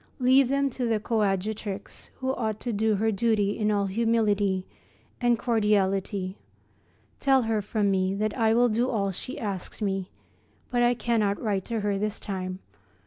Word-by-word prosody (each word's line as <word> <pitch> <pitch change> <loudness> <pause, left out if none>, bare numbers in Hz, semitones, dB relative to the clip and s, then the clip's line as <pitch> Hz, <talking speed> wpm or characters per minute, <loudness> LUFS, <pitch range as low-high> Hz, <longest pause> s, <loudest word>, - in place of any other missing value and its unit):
Leave 260 +1 +5
them 275 +1 +2
to 250 -2 -2
the 225 -2 +1
coadjutrix, 210 -2 -2
who 260 0 -2
ought 220 -4 -2
to 240 - -3
do 215 +1 +2
her 220 +2 +1
duty 210 -1 +1
in 215 -2 0
all 205 -1 +1
humility 205 -3 +1 0.6
and 240 -1 +3
cordiality. 200 -4 0 0.8
Tell 270 -2 +4
her 220 -1 0
from 205 0 0
me 190 0 +1
that 215 +1 -1
I 225 -2 +3
will 245 +1 +5
do 235 +4 +1
all 200 -4 0
she 225 +7 -7
asks 195 -4 -4
me, 195 -3 -2 0.6
but 245 -1 +2
I 240 0 +4
cannot 220 -4 0
write 200 -5 -1
to 230 -2 -2
her 205 -1 0
this 210 0 -2
time. 185 -2 -4
215 Hz, 165 wpm, -27 LUFS, 200-235 Hz, 0.8 s, Leave